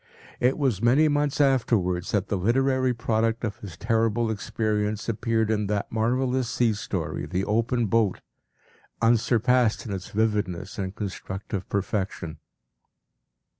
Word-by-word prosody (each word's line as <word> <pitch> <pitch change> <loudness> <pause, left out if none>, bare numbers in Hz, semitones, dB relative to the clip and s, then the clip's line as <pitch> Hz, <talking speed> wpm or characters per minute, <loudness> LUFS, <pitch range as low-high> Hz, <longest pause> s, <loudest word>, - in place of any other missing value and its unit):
It 125 +2 +2
was 130 -9 0
many 135 +7 +5
months 145 -1 0
afterwards 110 -10 +2
that 100 -1 0
the - - -1
literary 130 +6 +2
product 115 -1 0
of 110 -2 -2
his 90 -6 -10
terrible 115 +2 +1
experience 105 0 -2
appeared 115 0 0
in 105 -2 0
that 100 0 -2
marvellous 125 +2 0
sea 120 -3 +2
story 105 - -3
“The 95 +2 -1
Open 115 +2 +1
Boat,” 110 -2 +1 0.8
unsurpassed 120 0 +3
in 105 - -4
its 95 -1 -6
vividness 100 -4 -1
and 95 0 -3
constructive 95 -1 -5
perfection. 95 -5 -2
110 Hz, 130 wpm, -26 LUFS, 100-120 Hz, 0.8 s, many